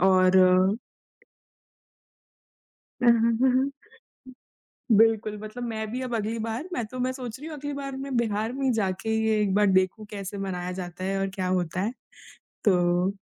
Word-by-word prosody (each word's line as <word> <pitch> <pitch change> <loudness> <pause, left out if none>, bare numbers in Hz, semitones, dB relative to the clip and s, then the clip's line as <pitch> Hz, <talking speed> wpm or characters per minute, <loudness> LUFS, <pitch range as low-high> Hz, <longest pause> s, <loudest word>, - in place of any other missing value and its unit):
और 185 0 +5 2.7
हुँ, 240 - +7
हुँ, 230 0 +3
हुँ, 260 +1 +4
हुँ। 275 +1 -1 1.2
बिल्कुल, 220 -1 +4
मतलब 215 +3 -7
मैं 220 -2 -3
भी 255 - -3
अब 250 -2 -3
अगली 220 +2 -2
बार 230 +9 -4
मैं 240 - -1
तो 255 +3 -8
मैं 255 +1 0
सोच 250 -2 -7
रही 300 +4 -8
हूँ 310 - -7
अगली 290 +1 -5
बार 275 -1 -5
मैं 270 -1 -4
बिहार 220 -1 0
में 265 0 0
जाके 200 0 -1
ये 220 -1 +2
एक 195 -2 +1
बार 210 0 +4
देखूँ 190 +3 +2
कैसे 200 -1 -6
मनाया 180 -2 -3
जाता 180 0 -6
है 195 0 -1
और 195 - 0
क्या 185 -2 -2
होता 185 -1 -1
है। 215 +5 -1 0.7
तो 180 -1 +3
215 Hz, 170 wpm, -26 LUFS, 190-245 Hz, 2.7 s, हुँ